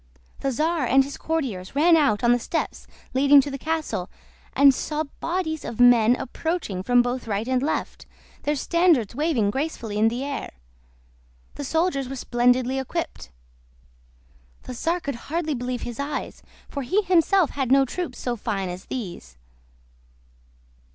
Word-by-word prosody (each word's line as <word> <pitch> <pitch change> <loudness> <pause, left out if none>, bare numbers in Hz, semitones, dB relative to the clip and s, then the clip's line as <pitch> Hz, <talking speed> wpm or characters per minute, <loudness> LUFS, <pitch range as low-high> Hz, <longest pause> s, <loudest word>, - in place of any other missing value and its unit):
The 275 - -1
czar 310 +1 0
and 270 +3 +5
his 280 +1 -7
courtiers 260 -12 -3
ran 330 +4 +5
out 275 -10 +2
on 235 - +5
the 245 - +3
steps 320 +7 -3 0.3
leading 280 +2 +6
to 285 - -5
the 275 - -5
castle, 315 - -2 0.5
and 280 -1 +7
saw 300 +4 -2 0.2
bodies 330 -2 -2
of 230 - -7
men 245 -1 +6
approaching 270 - -3
from 245 +4 +4
both 245 0 -3
right 210 +2 -2
and 255 -1 +1
left, 295 - -3 0.3
their 295 - 0
standards 330 - +2
waving 280 -10 +1
gracefully 235 -6 -3
in 220 - +5
the 240 +4 -1
air; 280 0 -5 1.0
the 290 - -6
soldiers 300 -3 0
were 270 - -5
splendidly 250 +1 +1
equipped. 325 +6 -4 1.3
The - - -7
czar 335 +8 -1
could 280 - -3 0.2
hardly 320 -1 -1
believe 250 -1 -3
his 240 +1 -6
eyes, 280 +2 -4 0.3
for 280 - -5
he 380 +11 +1
himself 370 -1 +3
had 265 -3 -2
no 270 0 +6
troops 350 +7 -5
so 245 -1 -2
fine 195 -4 -3
as 180 +1 -7
these. 175 - -7
270 Hz, 155 wpm, -24 LUFS, 240-315 Hz, 1.3 s, and